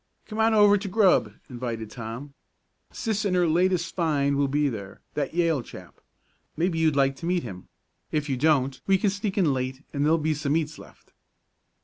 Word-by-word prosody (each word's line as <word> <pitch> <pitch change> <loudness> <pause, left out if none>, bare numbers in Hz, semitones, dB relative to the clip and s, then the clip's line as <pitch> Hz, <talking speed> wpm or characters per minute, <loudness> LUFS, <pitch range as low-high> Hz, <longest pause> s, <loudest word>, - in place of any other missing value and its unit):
"Come 215 0 -7
on 220 0 +4
over 205 -1 +6
to 200 - -5
grub," 190 - +3 0.2
invited 120 -3 -5
Tom. 120 +5 -7 0.6
"Sis 220 -2 -2
and 195 -3 +1
her 180 -1 +3
latest 175 +1 +1
find 145 -5 +1
will 140 0 +2
be 145 +2 +1
there 100 -7 -6
that 145 +1 -3
Yale 165 -5 +2
chap. 90 -6 -13 0.6
Maybe 165 0 0
you'd 160 -2 +2
like 135 -1 +2
to 165 - -6
meet 180 0 +1
him. 95 -6 -9 0.4
If 150 -1 -1
you 135 - 0
don't 135 -2 +1
we 195 0 +5
can 200 +1 +1
sneak 200 0 -3
in 165 -8 +3
late 130 +2 -4
and 140 -1 0
there'll 160 +2 +4
be 155 0 0
some 150 0 0
eats 155 -2 -3
left." - - -17
150 Hz, 195 wpm, -26 LUFS, 135-180 Hz, 0.6 s, over